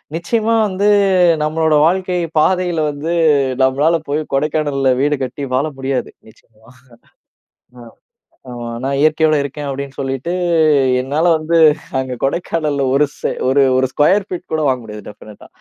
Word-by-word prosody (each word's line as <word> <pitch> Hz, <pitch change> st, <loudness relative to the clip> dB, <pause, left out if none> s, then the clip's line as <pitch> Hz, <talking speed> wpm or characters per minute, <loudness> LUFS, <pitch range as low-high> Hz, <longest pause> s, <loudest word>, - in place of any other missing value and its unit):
நிச்சயமா 225 Hz, +6 st, 0 dB
வந்து 200 Hz, +2 st, 0 dB, 0.5 s
நம்மளோட 155 Hz, 0 st, +1 dB
வாழ்க்கை 180 Hz, 0 st, -1 dB, 0.2 s
பாதையில 180 Hz, 0 st, +1 dB
வந்து, 155 Hz, +4 st, -4 dB, 0.5 s
நம்மளால 145 Hz, +6 st, +2 dB
போய் 150 Hz, +2 st, 0 dB
கொடைக்கானல்ல 145 Hz, -2 st, 0 dB
வீடு 145 Hz, +1 st, +1 dB
கட்டி 130 Hz, +3 st, -6 dB
வாழ 140 Hz, +4 st, +1 dB
முடியாது. 135 Hz, -1 st, -2 dB, 0.2 s
நிச்சயமா, 110 Hz, 0 st, -24 dB, 1.1 s
ஆ. -, -, -11 dB, 0.7 s
ஆமா. 120 Hz, -1 st, -7 dB, 0.2 s
"நான் 140 Hz, 0 st, -1 dB
இயற்கையோடு 155 Hz, 0 st, +3 dB
இருக்கேன்." 145 Hz, +1 st, -6 dB
அப்படின்னு 135 Hz, 0 st, -6 dB
சொல்லிட்டு 135 Hz, +5 st, -3 dB, 0.7 s
என்னால 145 Hz, +6 st, -1 dB
வந்து 165 Hz, +2 st, 0 dB, 0.4 s
அங்க 130 Hz, -1 st, -3 dB
கொடைக்கானல்ல 150 Hz, -1 st, -1 dB
ஒரு 145 Hz, -, +4 dB
செ -, -, -2 dB, 0.2 s
ஒரு 140 Hz, +1 st, +3 dB
ஒரு 130 Hz, 0 st, +2 dB
ஸ்கொயர் 190 Hz, +7 st, +2 dB
பீட் 180 Hz, -, -7 dB
கூட 155 Hz, -, 0 dB
வாங்க 130 Hz, -2 st, 0 dB
முடியாது, 105 Hz, -1 st, -10 dB
டெஃபனட்டா. 105 Hz, 0 st, -13 dB
145 Hz, 135 wpm, -17 LUFS, 135-165 Hz, 1.1 s, ஒரு